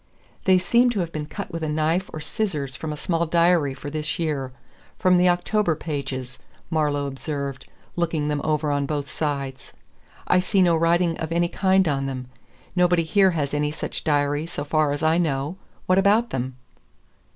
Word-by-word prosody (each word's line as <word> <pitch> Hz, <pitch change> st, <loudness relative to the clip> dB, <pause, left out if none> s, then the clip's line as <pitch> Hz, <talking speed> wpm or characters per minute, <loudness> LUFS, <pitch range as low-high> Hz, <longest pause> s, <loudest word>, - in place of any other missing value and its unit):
"They 185 Hz, -1 st, +6 dB
seem 240 Hz, +7 st, +3 dB
to 230 Hz, -4 st, -1 dB
have 170 Hz, -1 st, -3 dB
been 150 Hz, -2 st, -4 dB
cut 200 Hz, -, -6 dB
with 165 Hz, -1 st, -4 dB
a 155 Hz, -, -2 dB
knife 160 Hz, +5 st, 0 dB
or 155 Hz, -, -6 dB
scissors 150 Hz, -, -3 dB
from 155 Hz, +2 st, -5 dB
a 150 Hz, -, -5 dB
small 170 Hz, +1 st, 0 dB
diary 170 Hz, -4 st, +3 dB
for 145 Hz, +2 st, -7 dB
this 155 Hz, 0 st, -2 dB
year 145 Hz, -6 st, -2 dB, 0.5 s
from 185 Hz, -1 st, +4 dB
the 180 Hz, 0 st, +5 dB
October 175 Hz, 0 st, +1 dB
pages," 135 Hz, -5 st, -5 dB, 0.3 s
Marlowe 145 Hz, -3 st, +1 dB
observed, 140 Hz, 0 st, -5 dB, 0.3 s
looking 165 Hz, -3 st, 0 dB
them 150 Hz, -1 st, -1 dB
over 150 Hz, -1 st, 0 dB
on 140 Hz, -1 st, 0 dB
both 145 Hz, -1 st, -2 dB
sides. 140 Hz, -3 st, -4 dB, 0.5 s
"I 180 Hz, -, +4 dB
see 190 Hz, +1 st, +2 dB
no 170 Hz, -2 st, +4 dB
writing 170 Hz, +1 st, +2 dB
of 160 Hz, 0 st, -4 dB
any 170 Hz, +1 st, +1 dB
kind 190 Hz, -1 st, +3 dB
on 135 Hz, -2 st, 0 dB
them. 130 Hz, -2 st, -5 dB, 0.5 s
Nobody 175 Hz, -1 st, +3 dB
here 190 Hz, +4 st, +4 dB
has 145 Hz, -2 st, -1 dB
any 150 Hz, 0 st, 0 dB
such 150 Hz, -, -4 dB
diary 145 Hz, +1 st, +1 dB
so 145 Hz, -, -5 dB
far 150 Hz, 0 st, +1 dB
as 145 Hz, +2 st, -3 dB
I 160 Hz, +2 st, +3 dB
know. 150 Hz, +1 st, -1 dB, 0.3 s
What 185 Hz, +1 st, +4 dB
about 215 Hz, +4 st, +3 dB
them?" 130 Hz, 0 st, -3 dB
155 Hz, 185 wpm, -24 LUFS, 145-175 Hz, 0.5 s, They